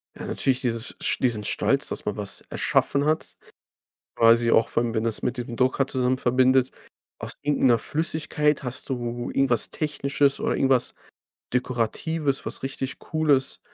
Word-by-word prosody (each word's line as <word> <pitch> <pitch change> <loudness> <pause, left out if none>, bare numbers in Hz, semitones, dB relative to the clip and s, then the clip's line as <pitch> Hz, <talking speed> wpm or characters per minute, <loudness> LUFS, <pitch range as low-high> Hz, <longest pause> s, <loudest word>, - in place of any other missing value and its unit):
Ja - - -8
natürlich 130 -1 0
dieses 115 -1 -3
sch - - +1
diesen 115 -5 0
Stolz, - - 0
dass - - -5
man - - -2
was - - -5
erschaffen 140 +1 +1
hat, 155 +1 -1 0.8
quasi 115 +1 +5
auch 115 - +4
vor 115 - +1
allem, 115 -1 -2
wenn 110 0 0
das 115 -2 -1
mit 125 +1 -1
diesem 120 -1 -5
Drucker 130 +2 +2
zusammen 130 -1 0
verbindet, 130 +1 +3 0.5
aus - - -3
irgend 145 0 0
'ner 120 -2 +5
Flüssigkeit 150 0 0
hast 130 +1 -4
du 120 -2 -3
irgendwas 135 -4 +1
Technisches 140 -2 0
oder - - 0
irgendwas 130 -2 +1 0.6
Dekoratives, 130 +4 -1
was - - -6
richtig 135 0 -4
Cooles, 150 -4 0
130 Hz, 155 wpm, -25 LUFS, 120-140 Hz, 0.8 s, quasi